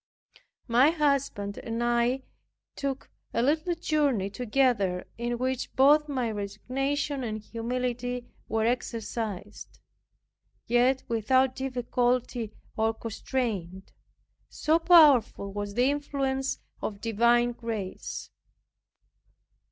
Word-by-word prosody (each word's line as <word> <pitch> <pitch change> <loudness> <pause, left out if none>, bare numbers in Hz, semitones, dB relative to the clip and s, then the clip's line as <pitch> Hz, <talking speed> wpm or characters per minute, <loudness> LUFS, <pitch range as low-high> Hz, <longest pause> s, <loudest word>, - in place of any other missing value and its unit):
My 250 +4 +5
husband 280 -10 0
and 230 +1 -3
I 240 +2 +1 0.5
took 275 -1 -4 0.2
a 235 - +2
little 310 +6 +1
journey 285 - 0
together, 230 -6 +1
in 240 0 -1
which 255 +1 -2
both 295 +3 +5
my 255 -5 -1
resignation 265 +7 -2
and 215 -2 -3
humility 245 +2 -3 0.2
were 220 0 +1
exercised, 225 -4 -3 0.9
yet 250 +3 +3
without 260 +3 +2
difficulty 245 -3 -1 0.2
or 220 0 +1
constraint, 210 -6 -4 0.6
so 315 +2 +2
powerful 290 - +5
was 205 0 -4
the 250 +3 +3
influence 275 -2 -1 0.2
of 200 -2 -4
divine 235 +2 +3
grace. 225 -5 -5
245 Hz, 95 wpm, -28 LUFS, 225-270 Hz, 0.9 s, My